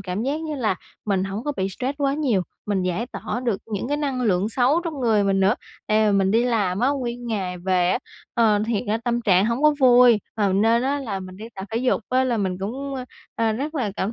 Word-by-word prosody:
cảm 190 +2 -3
giác 285 +5 -1
như 310 -2 -4
là 220 -8 0 0.3
mình 195 -2 0
hổng 195 +5 -5
có 295 - -1
bị 190 0 0
stress 260 +9 -4
quá 275 0 +2
nhiều, 250 -11 +1 0.2
mình 195 -3 0
giải 185 +6 -1
tỏa 245 - -5
được 225 -5 0
những 215 +3 -4
cái 290 - 0
năng 275 -4 -2
lượng 200 -2 +1
xấu 260 +7 +2
trong 310 -5 -4
người 220 -4 +3
mình 195 -1 +2
nữa. 195 +4 +4 0.3
Tại 215 0 +3
vì 200 - +3
mình 190 0 +2
đi 230 +3 +3
làm 205 -6 0
á 255 - +3
nguyên 245 -3 -3
ngày 190 -5 -3
về 180 0 +1
á, - - +1 0.4
ờ, 220 -3 +4
thiệt 225 -4 0
ra 220 +2 +1
tâm 240 0 0
trạng 195 -2 +3
hổng 235 +5 -1
có 300 -1 +5
vui, 245 -4 +6
à, 205 -3 +1
nên 225 +4 +3
á 280 +2 0
là 200 -8 -4
mình 185 0 -9
đi 210 - -9
tập 190 - -6
thể 225 - -2
dục 250 -1 +1
á 260 +1 +2
là 245 -2 0
mình 190 -3 -1
cũng, 265 +8 -4
ơ, 255 -1 -4 0.3
à, 225 -1 +1
rất 290 +8 -4
là 235 -8 -1
cảm 200 +4 -1
225 Hz, 255 wpm, -23 LUFS, 195-255 Hz, 0.4 s, vui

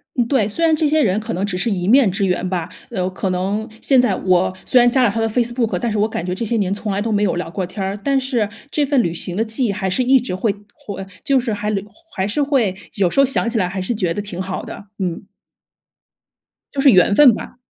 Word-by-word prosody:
嗯， 245 -3 +2
对， 235 -6 +2
虽 330 +10 0
然 320 -1 +4
这 310 0 +1
些 310 +1 +3
人 195 -2 +1
可 220 +1 -5
能 190 +3 -1
只 190 -3 -3
是 180 +6 0
一 180 -4 -2
面 250 0 +5
之 195 +2 -1
缘 185 0 -1
吧， 175 -3 -2 0.2
呃， 185 -1 -2
可 190 0 -3
能 195 +4 -2
现 265 -3 +4
在 245 - +1
我 185 -1 +2
虽 255 - +4
然 245 0 +5
加 255 +1 +3
了 235 - +4
他 225 - -3
的 225 - +1
Facebook， 240 0 0
但 235 - -1
是 215 - -1
我 210 - +3
感 175 -6 -4
觉 180 - -2
这 190 - -3
些 230 +2 -1
年 195 -2 0
从 205 +1 -4
来 195 - -1
都 225 +1 -2
没 205 -1 +1
有 205 - +1
聊 175 -1 -4
过 190 - -3
天 190 +3 -6
儿， 195 +1 -2
但 275 -1 +2
是 255 -5 0 0.2
这 300 - +1
份 275 -2 +2
旅 170 - -1
行 175 +1 -5
的 220 - +2
记 225 +3 0
忆 215 - +1
还 190 -1 -3
是 190 +8 0
一 260 +1 +4
直 235 -7 -5
会 195 +4 0 0.2
会 195 -2 -8 0.2
就 275 -1 +3
是 240 -3 -2
还 210 +1 -2 0.4
还 190 0 -1
是 220 +8 0
会 265 -9 +1 0.2
有 195 -3 +2
时 275 - 0
候 275 - +7
想 260 -2 +2
起 235 - -2
来 185 - +1
还 190 +1 -4
是 185 +6 -2
觉 190 -6 -1
得 205 - -3
挺 190 -3 -6
好 190 0 -4
的， - - -9
嗯。 180 0 -3 1.5
就 280 - -1
是 275 -1 +7
缘 185 0 +5
分 270 -2 +7
吧。 - - -8
210 Hz, 315 characters per minute, -19 LUFS, 190-245 Hz, 1.5 s, 候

